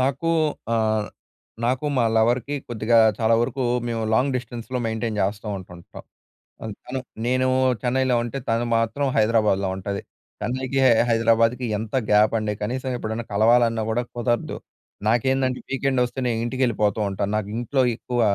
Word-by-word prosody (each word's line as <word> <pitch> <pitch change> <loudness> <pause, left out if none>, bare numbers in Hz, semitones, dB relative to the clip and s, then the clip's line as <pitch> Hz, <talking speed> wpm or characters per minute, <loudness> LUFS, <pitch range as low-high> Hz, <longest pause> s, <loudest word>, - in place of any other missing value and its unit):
నాకు 135 +5 0 0.5
ఆహ్, 110 -1 +1 0.6
నాకు 130 +5 0
మా 120 - +3
లవర్‍కి 120 +5 +2
కొద్దిగా 115 0 +2 0.2
చాలా 115 0 +3
వరకు 130 +2 -2 0.2
మేము 115 -1 -2
లాంగ్ 130 +3 +2
డిస్టెన్స్‌లో 120 +1 -5
మెయింటైన్ 110 -1 -2
చేస్తో 105 +2 -2
ఉంటుంటం. 90 -2 -12 0.6
అల్ 110 -2 -5
తను 130 +1 -3 0.3
నేను 130 +1 +2 0.3
చెన్నైలో 130 0 +1
ఉంటే, 120 +3 -4
తను 115 +1 +1
మాత్రం 115 +5 0
హైదరాబాద్‍లో 105 -3 +2
ఉంటది. 100 +1 -4 0.4
చెన్నైకి, 130 +2 -2 0.3
హైదరాబాద్‍కి, 115 +2 +2
ఎంత 110 +2 -6 0.2
గ్యాపండి! 105 0 +3
కనీసం 130 +4 -2
ఎప్పుడైనా 115 0 -4
కలవాలన్నా 115 +1 +3
కూడా 120 +2 0
కుదరదు. 120 -1 -1 0.5
నాకేందంటే, 130 +2 +1
వీకెండొస్తే, 130 -1 0
నే 120 - +1
ఇంటికెళిపోతో 120 -4 0
ఉంటాను. 100 +1 -2
నాకింట్లో 120 +6 -1
ఎక్కువ 120 +1 -3
115 Hz, 130 wpm, -23 LUFS, 110-130 Hz, 0.6 s, మా